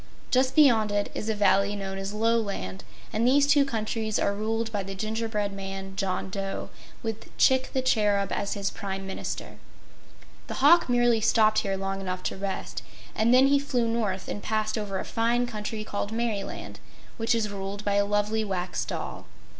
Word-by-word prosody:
Just 260 +1 +3
beyond 235 -9 +5
it 205 0 0
is 215 - -4
a 220 - +1
valley 205 0 +3
known 195 -1 -4
as 195 +1 -4
Loland, 210 - -1 0.3
and 215 - 0
these 280 +2 +5
two 285 0 +5
countries 220 -3 -2
are 200 - +1
ruled 225 +2 -2
by 205 -2 -1
the 195 0 -6
Gingerbread 215 0 -2
Man, 195 0 -6
John 190 -1 -2
Dough, 195 0 -4 0.3
with 225 -1 -4
Chick 260 0 +4
the 260 - 0
Cherub 205 -5 +2
as 200 - -1
his 200 -1 -2
Prime 195 -1 -5
Minister. 190 - -5 0.9
The - - -5
hawk 300 +3 +5
merely 240 -2 +3
stopped 215 0 +4
here 195 -1 -1
long 195 0 -3
enough 185 -1 -4
to - - -2
rest, 195 0 -4 0.3
and 225 +2 +2
then 255 +2 +7
he 280 +1 +4
flew 250 -4 0
north 215 -5 -1
and 205 - -4
passed 215 0 -1
over 205 -3 -3
a - - -4
fine 235 +2 +1
country 215 -2 -4
called 205 -1 -3
Merryland, 225 -3 -3 0.4
which 230 +1 +1
is 220 -2 0
ruled 200 +1 -5
by 205 - +1
a 200 0 +4
lovely 205 +2 0
Wax 185 -3 -2
Doll. - - -5
210 Hz, 180 wpm, -27 LUFS, 195-230 Hz, 0.9 s, then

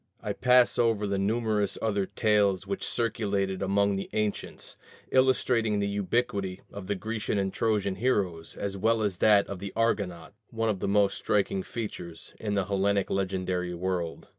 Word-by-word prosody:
I - - -3
pass 125 -1 +4
over 115 -3 +2
the 100 -1 -1
numerous 105 0 0
other 100 -3 0
tales 105 -4 +2
which 195 - -4
circulated 100 -5 -1
among 100 0 +2
the 95 - -5
ancients, 105 -1 -3 0.4
illustrating 125 -4 +3
the 100 0 0
ubiquity 100 -2 -1
of 100 -2 -7
the 100 - 0
Grecian 110 +1 -3
and 95 -1 -1
Trojan 105 -4 0
heroes 95 -8 -1
as 100 -1 -4
well 110 +3 +2
as 100 -4 -1
that 105 0 +5
of 100 - -6
the 100 0 -6
Argonauts 100 -8 -1 0.2
one 115 -1 -1
of 100 -3 -1
the - - -2
most 100 0 +2
striking 100 -2 +1
features 90 -6 -7
in 105 -2 -2
the 100 -2 +1
Hellenic 100 +1 +1
legendary 95 -2 -1
world. 90 -2 -3
100 Hz, 165 wpm, -28 LUFS, 95-110 Hz, 0.4 s, that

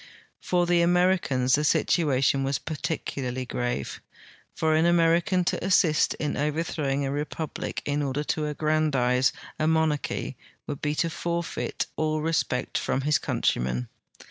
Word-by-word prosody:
For 175 -1 +1
the 175 0 +3
Ameri 180 +1 +3
cans 130 -1 0
the 150 - +3
situation 140 -3 +2
was 135 +1 0
particularly 135 -5 -4
grave. 120 - -3 0.5
For 160 -1 +1
an 160 +2 +3
American 175 +2 +3
to 175 - -1
assist 180 -4 +3
in 150 -1 -2
overthrowing 145 -2 -1
a 135 - -2
republic 150 +2 -4
in 145 0 0
order 140 +1 -1
to 150 0 -1
aggrandize 145 -4 +2 0.3
a 155 - +1
mon 160 -1 +3
arch 150 - -3
v - - -4 0.3
would 145 - -6
l)e 150 0 0
to 170 +2 +1
forfeit 170 +1 -3
all 155 0 0
respect 155 -5 -1
from 135 - -1
his 150 +2 +2
countrymen. 60 0 -1
150 Hz, 145 wpm, -26 LUFS, 135-165 Hz, 0.5 s, the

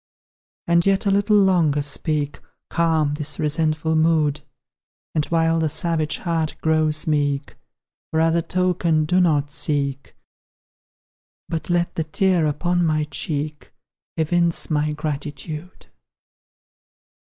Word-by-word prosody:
And 170 0 +3
yet 195 +2 +2
a 200 - +3
little 205 +2 +3
longer 170 -7 +3
speak, 145 0 -1 0.3
Calm 160 -3 +1
this 150 -1 -2
resentful 160 +1 0
mood; 155 -2 +2 0.7
And 150 -2 0
while 165 0 +2
the 160 -1 +1
savage 155 0 0
heart 165 -3 -2
grows 155 -1 +1
meek, 145 -2 -1 0.5
For 160 - 0
other 165 +1 +3
token 175 -2 +1
do 180 +4 +2
not 145 -4 +1
seek, 140 -2 -2 1.3
But 160 -1 -4
let 175 0 +1
the 160 - -1
tear 170 +1 +2
upon 175 +4 0
my 155 -2 +1
cheek 150 -1 -3 0.5
Evince 170 +1 +1
my 150 0 +1
gratitude! 150 +2 -6
160 Hz, 115 wpm, -22 LUFS, 150-170 Hz, 1.3 s, And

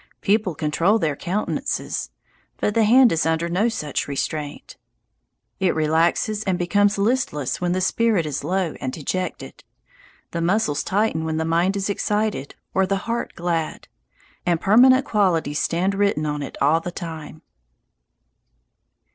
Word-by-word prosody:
People 200 -4 +1
control 165 +8 +2
their 155 -8 0
countenances, 190 +8 -3 0.5
but 210 - 0
the 225 0 +3
hand 245 +2 +6
is 165 - +1
under 160 +1 0
no 190 +7 +1
such 155 -11 -3
restraint. 145 +1 -4 0.8
It 185 -2 +1
relaxes 165 +7 +1
and 190 -2 +1
becomes 205 +3 +2
listless 200 - 0
when 175 0 +1
the 185 - 0
spirit 210 -2 +2
is 145 -2 -3
low 180 +1 -1
and 130 - -2
dejected; 180 +6 -5 0.7
the 170 - -3
muscles 170 -4 +1
tighten 195 -5 0
when 160 -1 -2
the 160 - -1
mind 170 +4 +1
is 195 - -1
excited 210 -6 -1 0.2
or 190 0 +2
the 195 0 -2
heart 235 0 -3
glad; 170 -2 -2 0.6
and 175 -2 +1
permanent 255 +7 +5
qualities 165 -8 +1
stand 180 +4 0
written 200 -6 +1
on 150 -1 -2
it 140 - -7
all 150 +4 +3
the 170 - -5
time. 160 -3 -8
175 Hz, 145 wpm, -22 LUFS, 160-205 Hz, 0.8 s, hand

